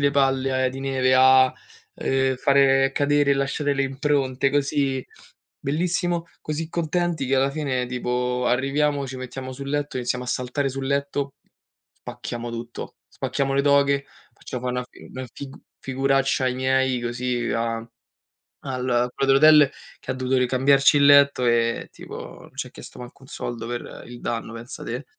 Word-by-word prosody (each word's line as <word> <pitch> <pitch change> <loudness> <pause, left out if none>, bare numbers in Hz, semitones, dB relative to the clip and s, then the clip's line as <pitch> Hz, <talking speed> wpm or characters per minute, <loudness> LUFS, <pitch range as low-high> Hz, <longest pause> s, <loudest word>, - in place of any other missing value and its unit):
le 140 0 +3
palle, 135 -1 +1
ehm, 130 - 0
di 135 - -7
neve, 130 -1 +1
a, 130 0 +6 0.4
ehm, 130 -1 0
fare 135 0 +4
cadere 145 0 +2
e - - +3
lasciare 140 +1 0
le 135 - +1
impronte, 135 -1 0
così, 140 -2 0 0.6
bellissimo, 170 +3 -1 0.2
così 155 +1 -4
contenti 170 -2 -1
che 135 - +2
alla 135 +1 +3
fine 135 -4 -1
tipo 125 0 -1
arriviamo, 140 +3 +1
ci 130 - -7
mettiamo 130 +1 -7
sul 140 +1 -7
letto, 145 -2 -2
iniziamo 125 0 -2
a - - -11
saltare 125 +3 -1
sul 135 0 -5
letto, 140 0 -1 0.6
spacchiamo 120 0 -7
tutto, 115 0 -7
spacchiamo 135 0 -2
le 140 - +3
doghe, 140 -1 +3 0.3
facciamo 125 +1 -7
fare 125 0 -2
una 125 - -2
fi - - -16
una 130 0 -6
figu 140 -1 -9 0.2
figuraccia 135 0 +1
ai 125 - 0
miei 130 -1 +1
così 120 0 -2
a 115 0 -2 0.8
al 125 -2 0
quel 135 - -1
dell'hotel 150 +1 +7 0.3
che - - -7
ha - - -1
dovuto 130 0 0
ricambiarci 135 +3 +4
il 140 - +5
letto, 140 -2 +6
ehm, 115 0 +1
tipo - - -9
non - - -16
ci - - -3
ha - - -20
chiesto - - -12
manco 125 +2 -11
un 130 - -15
soldo 120 -3 -5
per 120 0 -6
il 120 0 -10
danno, 115 -1 -4
pensa 115 +1 -8
te. 125 +4 -5
135 Hz, 165 wpm, -23 LUFS, 125-140 Hz, 0.8 s, dell'hotel